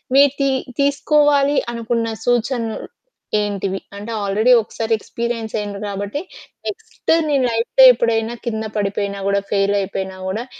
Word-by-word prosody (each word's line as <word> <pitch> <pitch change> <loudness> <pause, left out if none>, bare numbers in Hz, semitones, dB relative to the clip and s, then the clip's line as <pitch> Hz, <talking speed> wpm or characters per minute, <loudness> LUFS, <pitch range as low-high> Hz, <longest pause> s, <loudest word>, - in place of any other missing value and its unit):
మీరు 280 -1 +7
తి 275 0 +2 0.3
తీసుకోవాలి 285 0 +3 0.2
అనుకున్న 230 0 -1 0.2
సూచనలు 240 -1 0 0.6
ఏంటివి? 195 -2 -2 0.2
అంటే 210 +3 -7
ఆల్‌రెడి 215 +5 +3
ఒకసారి 225 +1 -3
ఎక్స్‌పిరియన్స్ 230 -1 -4
అయిండ్రు 205 -1 -5
కాబట్టి 200 +8 -4 0.5
నెక్స్ట్ 445 -5 -2 0.2
మీ 290 - +2
లైఫ్‌లో 230 +3 +4
ఎప్పుడైనా 230 0 0
కింద 220 -1 -2
పడిపోయినా 200 0 -2
గూడా 200 0 +2
ఫెయిలయిపోయినా 195 -1 0
గూడా 220 +6 -3
225 Hz, 120 wpm, -19 LUFS, 200-250 Hz, 0.6 s, మీరు